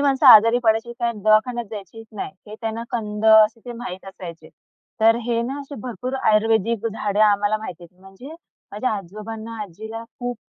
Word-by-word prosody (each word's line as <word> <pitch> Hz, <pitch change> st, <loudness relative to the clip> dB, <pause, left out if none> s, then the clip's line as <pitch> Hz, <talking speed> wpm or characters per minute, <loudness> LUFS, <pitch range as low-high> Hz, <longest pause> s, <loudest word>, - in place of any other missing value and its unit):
माणसं 275 Hz, -1 st, +2 dB
आजारी 230 Hz, 0 st, +8 dB
पडायची 225 Hz, +1 st, +1 dB
काय 235 Hz, -1 st, 0 dB
दवाखान्यात 215 Hz, +3 st, +2 dB
जायचीच 220 Hz, +2 st, -9 dB
नाही. 195 Hz, -2 st, -6 dB
ते 210 Hz, -, -9 dB
त्यांना 225 Hz, 0 st, -3 dB
कंद 210 Hz, -2 st, -4 dB
असे 220 Hz, +1 st, +6 dB
ते 245 Hz, -, -6 dB
माहीत 230 Hz, -6 st, -7 dB
असायचे. 170 Hz, -4 st, -10 dB, 0.5 s
तर 225 Hz, +1 st, +5 dB
हे 235 Hz, -1 st, +1 dB
ना, 270 Hz, +4 st, -4 dB
असे 280 Hz, +1 st, -9 dB
भरपूर 255 Hz, +1 st, -5 dB
आयुर्वेदिक 220 Hz, +1 st, +2 dB
झाडं 210 Hz, -1 st, -2 dB
आम्हाला 205 Hz, +1 st, +2 dB
माहिती 185 Hz, -5 st, -8 dB
आहेत. 180 Hz, +2 st, -20 dB
म्हणजे 195 Hz, +10 st, -12 dB, 0.4 s
माझ्या 210 Hz, +5 st, -1 dB
आजोबांना, 215 Hz, +4 st, -8 dB
आजीला 220 Hz, +4 st, -8 dB
खूप 245 Hz, 0 st, -6 dB
220 Hz, 165 wpm, -22 LUFS, 210-235 Hz, 0.5 s, आजारी